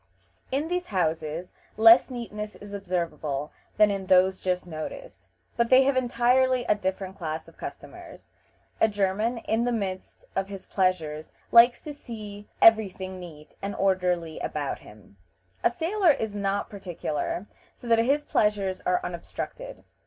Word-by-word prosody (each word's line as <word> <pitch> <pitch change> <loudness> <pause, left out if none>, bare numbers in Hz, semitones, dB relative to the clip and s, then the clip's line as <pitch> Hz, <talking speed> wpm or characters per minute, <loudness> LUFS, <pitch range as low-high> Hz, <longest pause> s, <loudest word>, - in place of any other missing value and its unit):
In 280 +4 0
these 355 +1 -2
houses 165 -2 -2 0.3
less 225 +4 +8
neatness 215 -4 -6
is 205 0 -11
observable 170 -7 -3 0.3
than 210 -1 +6
in 195 -1 -4
those 185 +1 +4
just 180 -1 -1
noticed, 175 - -8 0.3
but 235 -1 +1
they 260 +1 +7
have 275 0 +2
entirely 250 0 +2
a - - +4
different 190 -1 -4
class 160 -4 -5
of - - -16
customers. - - -10 0.5
A - - +5
German, 210 +3 0
in 225 0 -1
the 245 - 0
midst 195 -5 -4
of 195 0 0
his 195 -1 -8
pleasures, 165 -5 -1 0.2
likes 240 +1 +7
to 300 - -7
see 210 -6 -9
every 220 -3 +7
thing 185 0 -7
neat 155 -4 -11
and 200 +1 -4
orderly 180 -4 0
about 145 -2 -3
him; 105 -1 -17 0.5
a - - +5
sailor 345 - +1
is 225 -8 +1
not 200 0 -1
particular, 175 -3 -4 0.3
so - - -15
that 230 -1 +4
his 280 +6 +2
pleasures 200 -3 +1
are 180 - +2
unobstructed. - - -6
200 Hz, 150 wpm, -26 LUFS, 180-235 Hz, 0.5 s, less